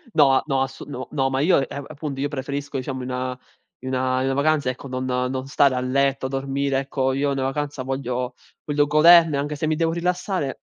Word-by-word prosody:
No, 135 -1 +5
no, 135 -2 +1
ass 135 0 -4
no, 130 -3 -6 0.2
ma 135 0 -1
io, 160 -4 +3
eh, 140 - -6
appunto, 145 -2 -6
io 145 - +1
preferisco, 140 0 -4
diciamo, 130 0 -4
in 130 - -5
una 125 0 -3 0.4
in 130 - -6
una 130 +1 0
vacanza, 145 -1 +2
ecco, 130 +2 -6
non 130 0 -3
non 130 +1 -2
stare 140 -1 +3
a - - 0
letto, 135 +1 +1
dormire, 135 0 -1
ecco. 135 -1 -1
Io 140 +1 0
i - - 0
una 135 - -2
vacanza 140 0 -3
voglio 125 -1 -3 0.3
voglio 145 0 +1
goderne, 160 0 +6
anche 145 +1 -2
se 155 +2 -2
mi 155 - +1
devo 165 +1 +1
rilassare 180 -3 -2
135 Hz, 200 wpm, -23 LUFS, 130-145 Hz, 0.4 s, goderne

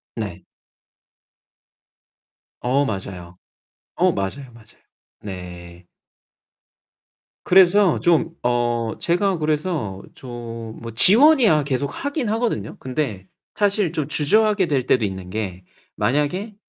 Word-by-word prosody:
네. - - -6 2.2
어 135 +3 +1
맞아요. 95 -4 -6 0.6
어 - - +2
맞아요, 120 +7 -5
맞아요. 110 -2 -19 0.4
네. 90 -2 -10 1.6
그래서 190 0 +4
좀 165 -1 +2
어 120 -2 -1
제가 180 +1 0
그래서 150 - -2
좀 120 -2 -9 0.3
뭐 115 - -6
지원이야 215 - +6
계속 140 0 -2 0.2
하긴 285 -4 -2
하거든요. 220 - -2
근데 125 -8 -4 0.3
사실 200 -4 +1
좀 155 -4 -3
주저하게 205 +6 +2
될 140 -4 0
때도 120 -4 +1
있는 95 -2 -5
게 95 -4 -5 0.3
만약에 150 - -1
135 Hz, 200 characters per minute, -21 LUFS, -, 2.2 s, 지원이야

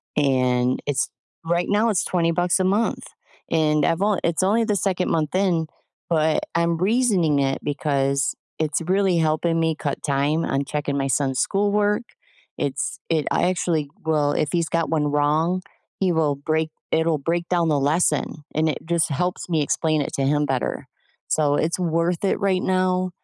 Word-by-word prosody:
and 125 -3 +2
it's 140 -2 0 0.4
right 170 +1 0
now 210 +3 +3
it's 190 -6 +1
20 170 -2 +1
bucks 175 +2 +1
a - - +2
month, 200 +5 0 0.4
and 155 -2 +2
I've 165 +2 0
on 205 -2 +2
it's 170 +2 +1
only 215 +4 +3
the 215 -2 0
second 185 -1 0
month 155 -2 0
in, 180 -4 +1 0.4
but 155 -2 +2
I'm 170 0 +1
reasoning 190 - +2
it 135 -1 0
because 140 -1 0 0.2
it's 155 +1 0
really 185 +1 +1
helping 165 +1 +1
me 160 -1 +1
cut 145 -3 -4
time 145 +3 +1
on 135 +1 -1
checking 145 0 -2
my 135 - 0
son's 135 -1 0
schoolwork. 205 - +1 0.6
It's 140 -1 -2
it 155 -3 +1
I 180 - +2
actually 165 -5 -1 0.2
will 150 -2 +1
if 150 -1 0
he's 170 -2 0
got 165 -1 0
one 150 -2 +1
wrong, 155 +5 +1 0.4
he 190 -2 +2
will 155 -3 +1
break 155 +2 -1 0.2
it'll 160 -1 +2
break 170 +4 -2
down 170 -2 +2
the 145 -2 +2
lesson, 150 +1 0
and 160 +1 +2
it 150 - -2
just 170 -1 +1
helps 180 +5 -2
me 160 -3 +1
explain 155 +1 0
it - - -4
to 135 - -1
him 145 +1 +2
better, 135 -3 -2 0.4
so 145 -2 +2
it's 165 +4 0
worth 170 +1 0
it 195 - +1
right 195 -3 +1
now, 185 0 +1
160 Hz, 175 wpm, -23 LUFS, 145-180 Hz, 0.6 s, now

